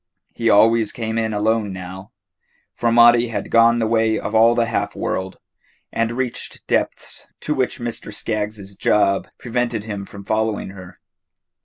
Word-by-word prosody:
He 115 -1 0
always 110 +1 +4
came 115 -1 -3
in 110 -1 -1
alone 105 0 0
now, 95 +1 -8 0.6
for 120 -1 0
Maudie 120 +1 +6
had 115 - -5
gone 115 0 +5
the 115 - +1
way 110 0 +2
of - - -5
all 115 +1 +5
the 120 - +2
half - - -2
world, 95 0 -3 0.6
and 115 0 0
reached 125 -1 -4
depths - - -2
to 150 - -1
which 130 -3 -1
Mr. 120 -3 -6
Skaggs's 105 -2 -4
job 100 -1 +2
prevented 120 -2 -2
him 100 -2 -6
from 100 -1 -11
following 110 -2 -1
her. 95 -1 -12
110 Hz, 155 wpm, -20 LUFS, 105-115 Hz, 0.6 s, Maudie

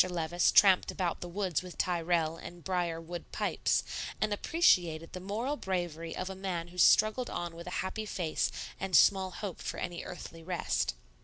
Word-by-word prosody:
Levice 175 0 +1
tramped 190 -3 +6
about 175 -3 -2
the 175 - -5
woods 185 -2 -1
with 180 -1 -10
Tyrrell 170 -2 +1
and 175 0 -10
brier 175 -3 -1
wood 170 +1 -8
pipes, - - +1 0.4
and 215 -1 +1
appreciated 175 - +2
the 185 - -5
moral 220 +9 -2
bravery 175 - -3
of 185 - -3
a 190 - -4
man 180 -3 -3
who 180 - -14
struggled 215 +7 +5
on 175 -1 -4
with 170 +1 -9
a 180 - -2
happy 215 +3 -4
face 170 -6 -1 0.3
and 190 -2 +3
small 190 -1 +5
hope 190 0 -6
for - - -4
any 175 -1 -4
earthly 165 -2 -8
rest. 65 - -1
180 Hz, 175 wpm, -31 LUFS, 170-190 Hz, 0.4 s, tramped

